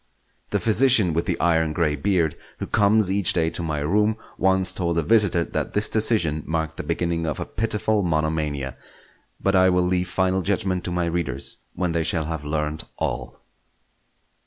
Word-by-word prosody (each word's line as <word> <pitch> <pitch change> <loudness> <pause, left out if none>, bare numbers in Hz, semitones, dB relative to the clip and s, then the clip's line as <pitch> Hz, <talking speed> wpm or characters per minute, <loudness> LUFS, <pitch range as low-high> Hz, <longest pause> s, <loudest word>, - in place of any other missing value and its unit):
The - - 0
physician 115 -5 +3
with 85 +2 -1
the - - -1
iron 80 -2 +2
grey 75 -2 +1
beard 85 -4 0 0.2
who - - -4
comes 105 -1 +3
each 100 -1 +2
day 80 -2 +1
to - - -2
my 75 -3 -2
room 105 +8 +1 0.2
once 95 0 +2
told 85 -2 -1
a 85 - +2
visitor 105 -4 +3
that - - -4
this 105 +1 +2
decision 105 -9 +1
marked 80 0 -2
the - - -4
beginning 85 +1 -1
of 75 - -3
a - - -3
pitiful 110 -1 0
monomania; 75 -5 -1 0.6
but 100 0 +1
I 95 0 +5
will 90 -1 +2
leave 90 0 0
final 95 0 +1
judgment 95 -1 -1
to 90 - -2
my 90 -1 0
readers 85 -4 -2 0.2
when 90 0 -1
they 85 0 0
shall 80 0 -1
have 80 -1 -4
learnt 75 +1 -2
all. - - -4
85 Hz, 180 wpm, -23 LUFS, 80-95 Hz, 0.6 s, I